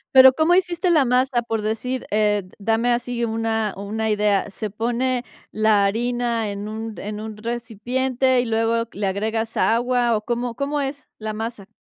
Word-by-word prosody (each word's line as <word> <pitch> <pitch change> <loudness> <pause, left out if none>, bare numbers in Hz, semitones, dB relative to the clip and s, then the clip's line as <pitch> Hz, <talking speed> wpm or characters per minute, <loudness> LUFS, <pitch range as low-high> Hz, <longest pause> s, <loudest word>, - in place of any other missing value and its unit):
Pero, 260 0 +10
¿cómo 320 +4 +3
hiciste 355 -1 +2
la 300 -5 +4
masa? 250 0 +2
Por 225 -2 -3
decir, 250 +4 -2
eh, 210 -1 +2
d 185 - -19
dame 225 +3 +2
así 240 0 -1
una 225 -1 -1
una 215 +2 -2
idea, 210 -1 +2
¿se 215 +1 -4
pone 245 +4 -1 0.2
la 215 -2 +3
harina 235 0 0
en 200 +1 -5
un 220 +1 -5
en 210 +1 -5
un 220 -1 -6
recipiente 245 +3 0
y 245 - +1
luego 225 +1 +1
le 200 0 -2
agregas 220 +3 -2
agua 240 0 +2
o, 210 - -1
cómo 240 0 -2
cómo 285 +2 -1
es 275 +1 -5
la 215 -1 -4
masa? 220 -2 -5
230 Hz, 175 wpm, -22 LUFS, 215-245 Hz, 0.2 s, Pero